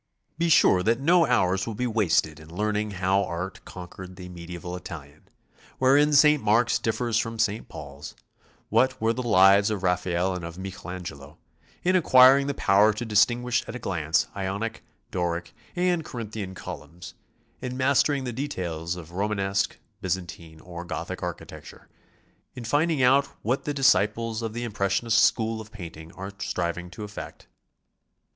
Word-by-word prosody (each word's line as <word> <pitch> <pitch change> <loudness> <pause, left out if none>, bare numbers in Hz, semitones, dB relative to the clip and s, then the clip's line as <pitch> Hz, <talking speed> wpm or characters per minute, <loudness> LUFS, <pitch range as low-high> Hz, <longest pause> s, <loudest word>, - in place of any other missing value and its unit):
Be 170 0 +2
sure 95 - +5
that 115 +5 +1
nc 165 -1 +4
hours 95 -4 +2
will 115 - -4
be 125 - -2
wasted 95 -9 +1
in 80 0 -14
learning 105 +4 -1
how 95 0 +1
Art 90 +2 -5
conquered 90 0 -10
the 90 -1 -9
mediaeval 90 0 -7
Italian, 75 -5 -10 0.5
wherein 140 +3 +4
St. 150 0 +5
Mark's 110 +2 +3
differs 115 0 0
from 115 0 -3
St. 110 0 -1
Paul's, 70 0 -9 0.5
what 130 0 +2
were 115 +1 +1
the 125 - -3
lives 100 -2 +5
of 105 -3 -3
Raphael 90 0 0
and 90 -2 -5
of 85 +1 -7
Michel 95 -1 -7
Angelo; 80 -5 -8 0.5
in 185 +1 +2
acquiring 135 -4 +6
the 140 - -2
power 105 0 +4
to 120 +3 -5
distinguish 120 +3 +2
at 115 - -6
a - - -2
glance 80 - 0
Tonic, 100 +4 -4 0.3
Doric, 85 -1 -2 0.2
and 175 -2 +1
Corinthian 110 -7 -6
columns, 85 -1 -9 0.5
in 125 0 -4
mastering 140 +1 +2
the 125 -2 -4
de 135 +5 -3
tails 85 - -4
of 85 -2 -10
Romanesque, 100 +1 -1 0.2
Byzantine 85 -3 -5
or 85 -1 -8
Gothic 85 -2 -5
architecture, - - -8 0.7
in 125 - -7
finding 145 +3 +1
out 135 +3 +5 0.2
What 125 +5 -1
the 145 - -1
disciples 115 -4 +2
of 115 -1 -4
the 120 +1 -4
impressionist 105 +1 +1
school 110 -1 +1
of 110 0 -13
painting 85 -5 -9
are 95 +1 -7
striving 90 0 -3
to 100 +4 -8
effect. 105 0 -9
105 Hz, 155 wpm, -26 LUFS, 90-120 Hz, 0.7 s, acquiring